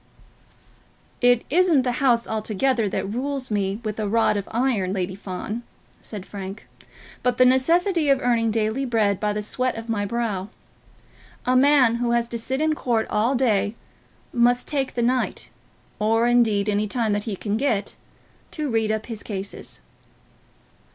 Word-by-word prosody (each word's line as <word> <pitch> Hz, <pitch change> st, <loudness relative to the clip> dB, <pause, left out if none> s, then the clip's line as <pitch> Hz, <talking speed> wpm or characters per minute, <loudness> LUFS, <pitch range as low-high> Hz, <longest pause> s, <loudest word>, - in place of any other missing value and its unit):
"It 245 Hz, -1 st, +4 dB
isn't 335 Hz, -4 st, +4 dB
the 250 Hz, -, 0 dB
House 240 Hz, -4 st, +3 dB
altogether 220 Hz, +1 st, 0 dB
that 190 Hz, +1 st, -2 dB
rules 265 Hz, 0 st, -3 dB
me 200 Hz, 0 st, -1 dB
with 215 Hz, 0 st, -4 dB
a 215 Hz, -, -1 dB
rod 225 Hz, 0 st, +2 dB
of 200 Hz, -1 st, -3 dB
iron, 225 Hz, -6 st, 0 dB
Lady 185 Hz, -1 st, -2 dB
Fawn," 200 Hz, +4 st, -5 dB, 0.4 s
said 205 Hz, -4 st, -8 dB
Frank, 195 Hz, 0 st, -8 dB, 0.5 s
"but 250 Hz, -1 st, +1 dB
the 255 Hz, -, +6 dB
necessity 330 Hz, +6 st, +3 dB
of 275 Hz, -1 st, +4 dB
earning 235 Hz, -3 st, +1 dB
daily 220 Hz, +4 st, 0 dB
bread 220 Hz, -6 st, +1 dB
by 210 Hz, -1 st, 0 dB
the 210 Hz, 0 st, -3 dB
sweat 255 Hz, +4 st, -1 dB
of 225 Hz, 0 st, -8 dB
my 210 Hz, -3 st, 0 dB
brow. 210 Hz, -4 st, -2 dB, 1.0 s
A 255 Hz, -, +2 dB
man 255 Hz, -3 st, +5 dB
who 240 Hz, 0 st, 0 dB
has 235 Hz, 0 st, +1 dB
to 235 Hz, -, -3 dB
sit 260 Hz, +5 st, -2 dB
in 310 Hz, 0 st, +2 dB
court 235 Hz, -6 st, 0 dB
all 225 Hz, +6 st, +2 dB
day 225 Hz, -4 st, +1 dB, 0.6 s
must 245 Hz, +1 st, +2 dB
take 275 Hz, -3 st, -2 dB
the 240 Hz, -, 0 dB
night, 250 Hz, +1 st, -1 dB, 0.5 s
or, 225 Hz, +2 st, +2 dB
indeed, 225 Hz, -4 st, +3 dB
any 210 Hz, 0 st, +1 dB
time 220 Hz, -1 st, 0 dB
that 205 Hz, 0 st, -2 dB
he 215 Hz, -4 st, -3 dB
can 205 Hz, +2 st, -3 dB
get, 220 Hz, -5 st, 0 dB, 0.6 s
to 300 Hz, -4 st, -3 dB
read 220 Hz, -1 st, +1 dB
up 220 Hz, 0 st, -2 dB
his 225 Hz, -4 st, -6 dB
cases." 195 Hz, -2 st, -6 dB
230 Hz, 165 wpm, -23 LUFS, 210-255 Hz, 1.0 s, the